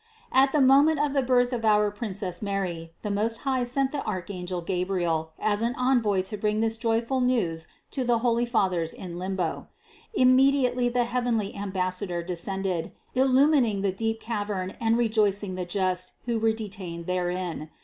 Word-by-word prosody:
330. 265 Hz, -, +5 dB
At -, -, -9 dB
the 285 Hz, -2 st, +4 dB
moment 285 Hz, +3 st, +5 dB
of 295 Hz, -1 st, +1 dB
the 275 Hz, -, +3 dB
birth 250 Hz, -1 st, +2 dB
of 235 Hz, -2 st, -2 dB
our 210 Hz, -1 st, +4 dB
Princess 200 Hz, -4 st, -5 dB
Mary 185 Hz, -5 st, -3 dB
the 210 Hz, -, -2 dB
Most 220 Hz, +3 st, -1 dB
High 260 Hz, -3 st, 0 dB
sent 265 Hz, +2 st, 0 dB
the 285 Hz, -, -3 dB
archangel 185 Hz, -2 st, -4 dB
Gabriel 175 Hz, -3 st, -1 dB
as 210 Hz, 0 st, 0 dB
an 235 Hz, +1 st, 0 dB
envoy 240 Hz, -7 st, +2 dB
to 210 Hz, +3 st, -5 dB
bring 210 Hz, +1 st, 0 dB
this 225 Hz, 0 st, +1 dB
joyful 230 Hz, +3 st, 0 dB
news 190 Hz, -11 st, 0 dB, 0.2 s
to 265 Hz, -, -2 dB
the 240 Hz, -1 st, +2 dB
holy 235 Hz, 0 st, +1 dB
Fathers 185 Hz, -8 st, 0 dB
in 175 Hz, -2 st, -7 dB
limbo. 185 Hz, -3 st, -3 dB, 0.5 s
Im 255 Hz, -5 st, +5 dB
mediately 255 Hz, -2 st, +3 dB
the 245 Hz, 0 st, +1 dB
heavenly 235 Hz, -4 st, -1 dB
ambassador 185 Hz, -2 st, -2 dB
descended, 180 Hz, 0 st, -3 dB, 0.2 s
illumining 260 Hz, -5 st, +3 dB
that 195 Hz, -1 st, -1 dB
deep 225 Hz, 0 st, -1 dB
cavern 205 Hz, -5 st, -3 dB
and 225 Hz, 0 st, +3 dB
rejoicing 210 Hz, -4 st, +1 dB
the 185 Hz, -1 st, -3 dB
just 185 Hz, 0 st, -1 dB
who 235 Hz, -2 st, 0 dB
were 225 Hz, 0 st, +3 dB
de 220 Hz, -1 st, -4 dB
tained 175 Hz, -4 st, -7 dB
therein. 180 Hz, -3 st, -2 dB
210 Hz, 170 wpm, -26 LUFS, 185-245 Hz, 0.5 s, 330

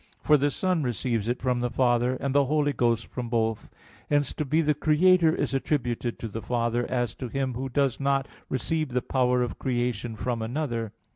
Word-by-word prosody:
For 150 Hz, -, +5 dB
the 145 Hz, 0 st, +2 dB
Son 180 Hz, +2 st, 0 dB
receives 120 Hz, -3 st, -1 dB
it 120 Hz, +1 st, -1 dB
from 125 Hz, -1 st, +1 dB
the 125 Hz, 0 st, 0 dB
Father, 120 Hz, 0 st, +2 dB
and 135 Hz, -1 st, -2 dB
the 140 Hz, -1 st, +4 dB
Holy 145 Hz, +1 st, +1 dB
Ghost 115 Hz, -3 st, +1 dB
from 125 Hz, -2 st, -6 dB
both. 115 Hz, -2 st, -1 dB, 0.4 s
Hence 145 Hz, -2 st, +2 dB
to -, -, -2 dB
be 155 Hz, +4 st, +2 dB
the 150 Hz, -1 st, +2 dB
Creator 160 Hz, +3 st, +4 dB
is 145 Hz, -1 st, -1 dB
attributed 125 Hz, -4 st, -1 dB
to 115 Hz, -, -5 dB
the 115 Hz, +1 st, -6 dB
Father 120 Hz, 0 st, -1 dB
as 120 Hz, -2 st, -1 dB
to 130 Hz, -, -6 dB
Him 135 Hz, +1 st, -2 dB
Who 130 Hz, +3 st, -4 dB
does 135 Hz, -1 st, +1 dB
not 140 Hz, -1 st, +1 dB, 0.2 s
receive 150 Hz, +2 st, -1 dB
the 125 Hz, 0 st, 0 dB
power 125 Hz, -1 st, +2 dB
of 120 Hz, -, -5 dB
creation 120 Hz, -3 st, -1 dB
from 115 Hz, +2 st, -2 dB
another. 115 Hz, -2 st, -2 dB
125 Hz, 200 wpm, -26 LUFS, 120-145 Hz, 0.4 s, For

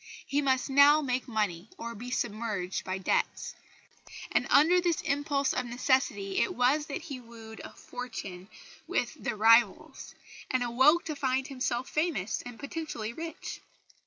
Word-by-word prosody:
He 285 Hz, +1 st, 0 dB
must 260 Hz, -2 st, +1 dB
now 285 Hz, +2 st, +6 dB
make 255 Hz, -1 st, -1 dB
money 210 Hz, -5 st, -2 dB
or 235 Hz, 0 st, -5 dB
be 235 Hz, +3 st, -8 dB
submerged 215 Hz, -6 st, -2 dB
by 185 Hz, 0 st, -3 dB
debts; 190 Hz, -, -1 dB, 0.8 s
and -, -, +1 dB
under 345 Hz, +5 st, +5 dB
this 345 Hz, -3 st, +1 dB
impulse 280 Hz, 0 st, 0 dB
of 250 Hz, -, -2 dB
necessity 240 Hz, -5 st, 0 dB
it -, -, 0 dB
was 275 Hz, +5 st, +2 dB
that 280 Hz, -, -5 dB
he 280 Hz, -6 st, -6 dB
wooed 225 Hz, -2 st, -11 dB
fortune 195 Hz, -7 st, -7 dB, 0.4 s
with -, -, -1 dB
The 220 Hz, -, -1 dB
Rivals, 225 Hz, 0 st, +3 dB, 0.3 s
and 255 Hz, -1 st, +1 dB
awoke 260 Hz, +8 st, +4 dB
to 310 Hz, -, -3 dB
find 265 Hz, -2 st, 0 dB
himself 255 Hz, -2 st, -2 dB
famous 300 Hz, -, -1 dB
and 245 Hz, -1 st, -10 dB
potentially 280 Hz, -7 st, -5 dB
rich. 325 Hz, +4 st, -7 dB
250 Hz, 145 wpm, -29 LUFS, 220-280 Hz, 0.8 s, now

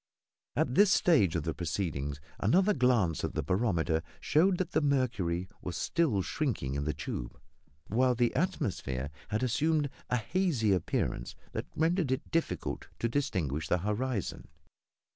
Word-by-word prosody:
At 125 Hz, -, +1 dB
this 200 Hz, +5 st, +6 dB
stage 135 Hz, -, +4 dB
of 85 Hz, -, 0 dB
the 80 Hz, 0 st, -1 dB
proceedings 75 Hz, -5 st, -2 dB, 0.2 s
another 185 Hz, -, +4 dB
glance 120 Hz, -, +2 dB
at -, -, -3 dB
the 80 Hz, -, 0 dB
barometer 85 Hz, -, +1 dB, 0.2 s
showed 180 Hz, +4 st, +3 dB
that 180 Hz, -1 st, -2 dB
the 155 Hz, -, +2 dB
mercury 115 Hz, -, 0 dB
was 90 Hz, -, -4 dB
still 135 Hz, -, +1 dB
shrinking 115 Hz, -, -2 dB
in 70 Hz, 0 st, -2 dB
the 75 Hz, -, 0 dB
tube, 65 Hz, -4 st, -5 dB, 0.5 s
while 125 Hz, +3 st, +2 dB
the 120 Hz, 0 st, +2 dB
atmosphere 90 Hz, -, -1 dB, 0.2 s
had 110 Hz, +3 st, -1 dB
assumed 145 Hz, +4 st, +1 dB, 0.2 s
a 125 Hz, -, +2 dB
hazy 130 Hz, -, +1 dB
appearance 80 Hz, -8 st, -1 dB, 0.2 s
that -, -, -4 dB
rendered 165 Hz, -2 st, +1 dB
it 130 Hz, +2 st, -2 dB
difficult 160 Hz, -, -1 dB
to 115 Hz, -, 0 dB
distinguish 85 Hz, -, -1 dB
the 90 Hz, -, +2 dB
horizon. 105 Hz, +3 st, -2 dB
110 Hz, 145 wpm, -31 LUFS, -, 0.5 s, this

